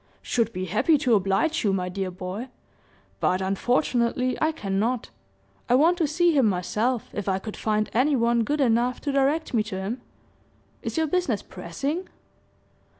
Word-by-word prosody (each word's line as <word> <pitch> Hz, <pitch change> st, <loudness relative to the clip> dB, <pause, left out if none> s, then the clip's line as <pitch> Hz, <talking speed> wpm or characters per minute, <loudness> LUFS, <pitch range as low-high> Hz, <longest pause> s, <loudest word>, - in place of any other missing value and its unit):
"Should 230 Hz, -2 st, 0 dB
be 185 Hz, -3 st, -4 dB
happy 305 Hz, -, +3 dB
to 255 Hz, -3 st, +1 dB
oblige 200 Hz, -, +2 dB
you, 205 Hz, -, +2 dB
my 180 Hz, -1 st, -1 dB
dear 190 Hz, +1 st, -3 dB
boy, 185 Hz, +6 st, -6 dB, 0.7 s
but, 185 Hz, -, +2 dB
unfortunately, 245 Hz, +5 st, +1 dB
I 315 Hz, 0 st, +3 dB
cannot. 220 Hz, -2 st, -2 dB, 0.6 s
I 245 Hz, -, +5 dB
want 335 Hz, +7 st, +4 dB
to 320 Hz, -, +2 dB
see 340 Hz, +2 st, +2 dB
him 265 Hz, -5 st, +4 dB
myself, 210 Hz, +6 st, -1 dB
if 205 Hz, -1 st, -3 dB
I 190 Hz, -, +1 dB
could 210 Hz, +2 st, -7 dB
find 215 Hz, -1 st, 0 dB
any 275 Hz, +5 st, +3 dB
one 235 Hz, -1 st, +2 dB
good 295 Hz, +6 st, 0 dB
enough 245 Hz, 0 st, +2 dB
to 285 Hz, -, -1 dB
direct 275 Hz, +3 st, +1 dB
me 225 Hz, -, +3 dB
to 210 Hz, -3 st, -4 dB
him. 210 Hz, +7 st, -4 dB, 0.8 s
Is -, -, -4 dB
your 320 Hz, -, +3 dB
business 300 Hz, -, 0 dB
pressing?" 275 Hz, -, -4 dB
235 Hz, 165 wpm, -25 LUFS, 195-280 Hz, 0.8 s, I